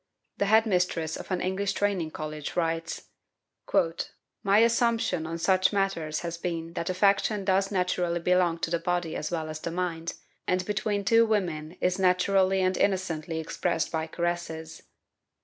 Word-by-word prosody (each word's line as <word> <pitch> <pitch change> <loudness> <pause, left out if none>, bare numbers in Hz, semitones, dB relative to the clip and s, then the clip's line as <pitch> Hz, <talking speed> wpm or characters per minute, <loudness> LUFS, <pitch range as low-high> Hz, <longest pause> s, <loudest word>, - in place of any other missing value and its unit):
The 200 - +2
head 220 +2 +5
mistress 180 -5 0
of - - -8
an 185 -2 -1
English 190 +2 -1
training 195 -6 0
college 155 -1 -6
writes: 165 -1 -1 0.7
"My 175 +4 0
own 225 - +7
assumption 230 -8 +1
on 165 +1 -3
such, 185 +2 +3
matters 195 -7 -1
has 170 -1 -5
been 165 -1 -4
that 170 - -3
affection 200 +2 +2
does 195 0 +2
naturally 180 -2 0
belong 180 -1 +2
to 165 - -1
the 170 - +1
body 175 -1 -1
as 150 - -3
well 160 -2 -2
as 155 0 -5
the 170 - -4
mind, 170 -1 -3 0.3
and 185 0 +1
between 205 0 -1
two 230 +2 +5
women 175 -6 -1
is 180 +1 +1
naturally 190 +1 +3
and 185 0 +1
innocently 170 -4 0
expressed 165 +1 -1
by, 160 -1 -2
caresses. 165 -1 -3
180 Hz, 160 wpm, -27 LUFS, 165-195 Hz, 0.7 s, own